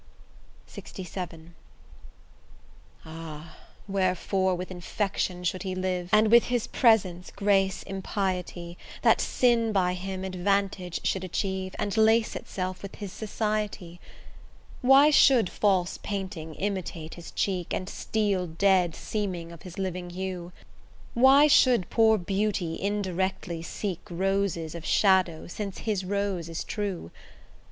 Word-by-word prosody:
LXVII 175 -3 -8 1.5
Ah! 160 0 -9 0.3
wherefore 190 -1 +1
with 180 +1 -6
infection 185 0 -2
should 180 +1 -1
he 185 -1 -3
live, 185 -1 -2
And 215 0 +5
with 235 0 +7
his 245 -2 0
presence 190 -7 +2
grace 195 -1 +1
impiety, 185 -3 -3 0.2
That - - +5
sin 235 -3 +2
by 185 -3 +2
him 190 +1 -5
advantage 190 -1 -1
should 190 - 0
achieve, 190 +1 -3
And 205 - -2
lace 220 0 +3
itself 185 -1 -4
with 200 - -8
his 200 -3 -7
society? 210 -5 -3 0.8
Why 270 +4 +7
should 255 -9 +5
false 190 -4 +1
painting 190 -6 -5
imitate 185 -5 -4
his 170 -1 -10
cheek, 185 -3 -2
And 185 - -2
steel 200 -4 -1
dead 180 0 +2
seeming 185 -6 -4
of 170 - -12
his 180 -2 -10
living 180 -2 -3
hue? 180 -1 -5 0.6
Why 265 +4 +7
should 255 -9 +4
poor 220 -1 +5
beauty 195 -3 -1
indirectly 190 -4 -2
seek 180 +1 -4
Roses 185 -3 -1
of 170 -2 -7
shadow, 185 -4 +3
since 195 +1 -5
his 205 -4 -2
rose 195 -3 -2
is 165 - -4
true? 200 - -4
190 Hz, 120 wpm, -27 LUFS, 175-205 Hz, 1.5 s, with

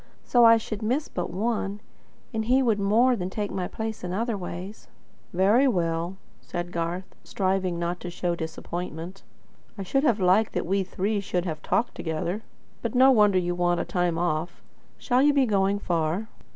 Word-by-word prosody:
So 240 -1 +4
I 230 0 +8
should 215 -1 -5
miss 255 +8 0
but 175 - -4
one; 205 +1 -2 0.5
and 220 -1 -1
he 260 +3 +3
would 225 -4 +2
more 225 +6 +4
than 185 -4 -3
take 205 +1 -3
my 185 -2 -2
place 220 -2 -5
in 180 0 -3
other 230 +3 -1
ways." 185 +2 -7 0.4
"Very 205 +9 +4
well," 170 -4 -1 0.2
said 175 +8 -5
Garth, 170 +2 -3
striving 185 -2 -1
not 170 +1 -2
to 175 - -6
show 175 0 -2
disappointment. 170 +2 -6 0.6
"I 195 - -4
should 270 +9 0
have 240 -8 +3
liked 190 +4 +3
that - - -1
we 195 +2 +1
three 200 +3 -1
should 180 -2 -2
have 155 -3 -4
talked 235 - 0
together. 170 +5 -3 0.4
But 230 +1 -3
no 260 +2 +7
wonder 210 -5 +5
you 175 -1 0
want 175 0 +1
a - - -1
time 175 -2 0
off. 170 0 -2 0.3
Shall 250 0 +1
you 290 +1 +4
be 275 -2 +4
going 200 -2 +2
far?" 175 +2 -1
190 Hz, 180 wpm, -26 LUFS, 175-220 Hz, 0.6 s, I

